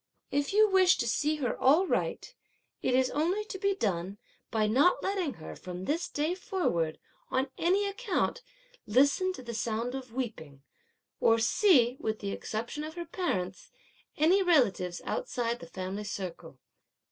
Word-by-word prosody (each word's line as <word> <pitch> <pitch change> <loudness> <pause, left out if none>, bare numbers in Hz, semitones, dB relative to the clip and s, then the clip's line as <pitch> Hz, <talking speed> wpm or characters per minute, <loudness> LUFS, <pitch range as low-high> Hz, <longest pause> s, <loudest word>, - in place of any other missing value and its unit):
If 285 0 0
you 430 +2 +5
wish 375 -2 +5
to - - -1
see 295 +7 +1
her 270 -5 -1
all 300 +9 +5
right, - - -2 0.5
it 250 - +1
is 260 0 +2
only 355 +8 0
to 385 -2 -7
be 395 0 +1
done 195 - -2 0.3
by 220 -1 +1
not 285 - +3
letting 375 -8 -1
her, 160 - -9
from 180 0 -7
this 325 - -1
day 305 +4 -1
forward, 250 - -1 0.3
on 260 +1 0
any 380 +4 +2
account, 435 +2 -1 0.5
listen 285 - +3
to 260 - -9
the 235 -1 -6
sound 230 +2 -2
of 260 -3 -6
weeping, 185 - -5 0.6
or 225 - +4
see, 250 - +4
with 220 0 -2
the 200 -2 -4
exception 235 +10 -4
of 315 +1 -7
her 345 -1 -5
parents, 190 - -3 0.5
any 345 +6 +4
relatives 230 - +2
outside 240 - -2
the 170 - -10
family 190 +3 -5
circle. 175 -7 -6
260 Hz, 160 wpm, -30 LUFS, 215-360 Hz, 0.6 s, you